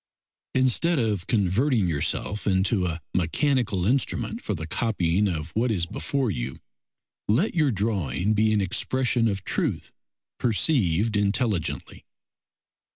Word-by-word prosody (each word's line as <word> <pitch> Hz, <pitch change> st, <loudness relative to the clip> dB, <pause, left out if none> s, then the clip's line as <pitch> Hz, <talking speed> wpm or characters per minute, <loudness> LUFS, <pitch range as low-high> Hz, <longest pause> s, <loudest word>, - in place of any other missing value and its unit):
Instead 130 Hz, +6 st, +3 dB
of 105 Hz, -8 st, -1 dB
converting 110 Hz, +1 st, +2 dB
yourself 85 Hz, +7 st, -2 dB
into 95 Hz, 0 st, +2 dB
a 85 Hz, -1 st, -3 dB
mechanical 100 Hz, -, +1 dB
instrument 115 Hz, -2 st, 0 dB
for 105 Hz, -, -3 dB
the 80 Hz, -1 st, -5 dB
copying 100 Hz, 0 st, 0 dB
of 80 Hz, -3 st, -3 dB
what 115 Hz, +6 st, 0 dB
is 90 Hz, -6 st, +1 dB
before 135 Hz, -, -2 dB
you, -, -, -4 dB, 0.7 s
let 130 Hz, -, +2 dB
your 155 Hz, -4 st, +2 dB
drawing 100 Hz, -, 0 dB
be 110 Hz, +1 st, +2 dB
an 105 Hz, -1 st, +2 dB
expression 120 Hz, +4 st, +1 dB
of 100 Hz, -3 st, -2 dB
truth -, -, -2 dB, 0.5 s
perceived 110 Hz, -, +1 dB
intelligently. 100 Hz, -, -1 dB
105 Hz, 120 wpm, -25 LUFS, 90-120 Hz, 0.7 s, Instead